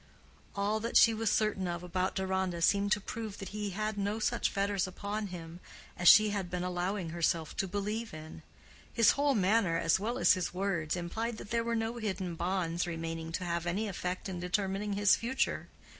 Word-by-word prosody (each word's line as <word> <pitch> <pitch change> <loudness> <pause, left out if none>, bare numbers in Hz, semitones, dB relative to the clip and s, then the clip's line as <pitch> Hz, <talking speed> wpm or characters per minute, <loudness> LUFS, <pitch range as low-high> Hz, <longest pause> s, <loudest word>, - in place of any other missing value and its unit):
All 205 +2 0
that 230 +2 +1
she 230 - +7
was 220 0 0
certain 210 -4 +1
of 170 0 -4
about 185 +1 -1
Deronda 190 -3 -1
seemed 200 +3 +3
to - - 0
prove 215 0 -6
that 195 - -7
he 210 0 -3
had 215 +2 -3
no 200 +2 -1
such 220 - 0
fetters 200 -1 0
upon 205 +3 -4
him 170 -2 -8 0.4
as 175 - 0
she 215 +3 +8
had 195 -3 -3
been 180 0 -3
allowing 180 0 -2
herself 165 -1 -1
to 195 - 0
believe 210 +4 -3
in. 155 0 -9 0.5
His 230 -3 +5
whole 285 -1 +2
manner 195 -3 +2
as 165 +2 +2
well 230 +5 -2
as - - +5
his 180 -1 -3
words 180 -5 -1
implied 220 +7 -3
that 205 - -10
there 230 0 +1
were 235 0 -1
no 225 +1 -2
hidden 190 -5 -3
bonds 175 0 -1
remaining 165 -1 -4
to 180 - -2
have 170 0 -2
any 200 +6 -1
effect 180 -1 -4
in 185 -2 -5
determining 195 +3 -1
his 205 0 +5
future. 260 +3 -1
195 Hz, 195 wpm, -31 LUFS, 175-215 Hz, 0.5 s, she